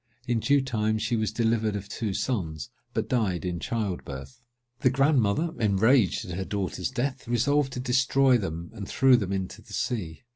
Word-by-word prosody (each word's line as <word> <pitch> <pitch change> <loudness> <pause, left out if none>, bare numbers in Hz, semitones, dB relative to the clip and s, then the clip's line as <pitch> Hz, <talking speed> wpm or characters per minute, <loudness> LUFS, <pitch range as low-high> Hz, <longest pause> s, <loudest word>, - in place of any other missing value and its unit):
In 120 -2 +1
due 140 +4 +3
time 110 -4 0
she 115 - -1
was 110 -1 0
delivered 110 -1 +1
of 100 -1 -5
two 105 +1 -3
sons, 80 - -2 0.2
but - - -2
died 100 -8 0
in 90 -1 -2
child 110 -5 -2
birth. 70 - -9 0.4
The 130 - +4
grandmother, 135 +1 +2
enraged 110 +1 +3
at 90 - -5
her 95 - -2
daughter's 95 +3 -3
death, 130 0 -3
resolved 135 +4 +2
to - - -4
destroy 130 0 +3
them, 85 -3 -5
and 100 -2 -7
threw 130 -1 +5
them 100 -5 -1
into 95 -1 -3
the - - -14
sea. 90 -9 -3
110 Hz, 180 wpm, -27 LUFS, 95-130 Hz, 0.4 s, threw